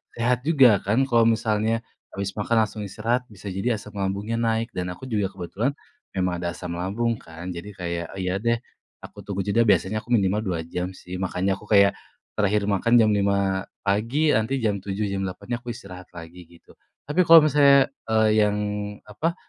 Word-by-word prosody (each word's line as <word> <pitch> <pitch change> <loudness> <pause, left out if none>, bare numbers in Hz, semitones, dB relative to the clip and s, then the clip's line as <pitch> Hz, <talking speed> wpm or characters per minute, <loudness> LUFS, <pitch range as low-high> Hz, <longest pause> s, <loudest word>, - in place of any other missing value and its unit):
sehat 120 +1 +1
juga, 130 - +6
kan, 105 +3 +1
kalau 115 -2 +4
misalnya 110 0 +1 0.3
habis 100 0 -4
makan 105 +2 -1
langsung 105 0 -8
istirahat 115 +6 -1
bisa 105 0 -11
jadi 100 +6 0
asam 105 - -12
lambungnya 100 +3 -2
naik 115 0 0
dan 90 -1 -2
aku 90 - -11
juga 105 -5 0
kebetulan, 100 +7 -2 0.4
memang 90 -1 0
ada 90 - -2
asam 90 -1 -6
lambung, 110 +6 -1
kan, 85 +1 -11
jadi 85 +4 -7
kayak 85 -1 -3
iya 90 -1 -1
deh, 115 +1 +2 0.5
aku - - -12
tunggu 100 -1 -3
jeda 110 +3 +3
biasanya 105 +1 +2
aku - - -22
minimal 100 0 +1
2 90 -5 -2
jam, 90 +2 -4
sih, 90 0 -9
makanya 95 +1 0
aku - - -14
kayak, 100 -1 +6 0.4
terakhir 105 0 +1
makan 105 +4 +2
jam 110 -2 +5
05:00 100 -1 +1 0.2
pagi, 115 +10 +1
nanti 110 +4 +1
jam 105 -2 +1
07:00, 100 +2 -4
jam 100 0 -2
08:00 120 +6 -5
aku 125 - -21
istirahat 90 -4 -11
lagi 85 +1 -11
gitu. 85 0 -20 0.3
Tapi 150 +6 +1
kalau 165 -1 +9
misalnya, 140 -2 +5 0.2
eee, 110 -1 +3
yang 105 -1 +3 0.5
apa 155 +12 -3
105 Hz, 180 wpm, -24 LUFS, 95-115 Hz, 0.5 s, kalau